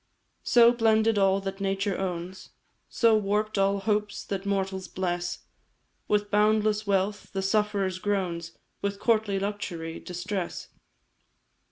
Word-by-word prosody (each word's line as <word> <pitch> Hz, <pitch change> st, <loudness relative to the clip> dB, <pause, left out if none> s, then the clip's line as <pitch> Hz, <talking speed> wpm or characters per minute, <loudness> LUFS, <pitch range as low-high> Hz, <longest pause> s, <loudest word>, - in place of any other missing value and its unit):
"So, 235 Hz, -1 st, +6 dB
blended 225 Hz, -2 st, +3 dB
all 195 Hz, 0 st, +3 dB
that 195 Hz, 0 st, -5 dB
nature 195 Hz, 0 st, 0 dB
owns, 185 Hz, 0 st, -5 dB, 0.4 s
So, 230 Hz, -2 st, +4 dB
warp'd 210 Hz, 0 st, 0 dB
all 195 Hz, +1 st, +3 dB
hopes 210 Hz, 0 st, -1 dB
that 195 Hz, 0 st, -4 dB
mortals 190 Hz, -1 st, -1 dB
bless 175 Hz, -1 st, -3 dB, 0.7 s
With 205 Hz, 0 st, +1 dB
boundless 210 Hz, 0 st, +2 dB
wealth, 200 Hz, +1 st, 0 dB
the 195 Hz, -1 st, -2 dB
sufferer's 200 Hz, -2 st, 0 dB
groans; 180 Hz, -5 st, -2 dB, 0.2 s
With 200 Hz, 0 st, -2 dB
courtly 215 Hz, -4 st, +2 dB
luxury, 180 Hz, -5 st, -4 dB
distress. 180 Hz, +1 st, -5 dB
200 Hz, 120 wpm, -27 LUFS, 190-210 Hz, 0.7 s, So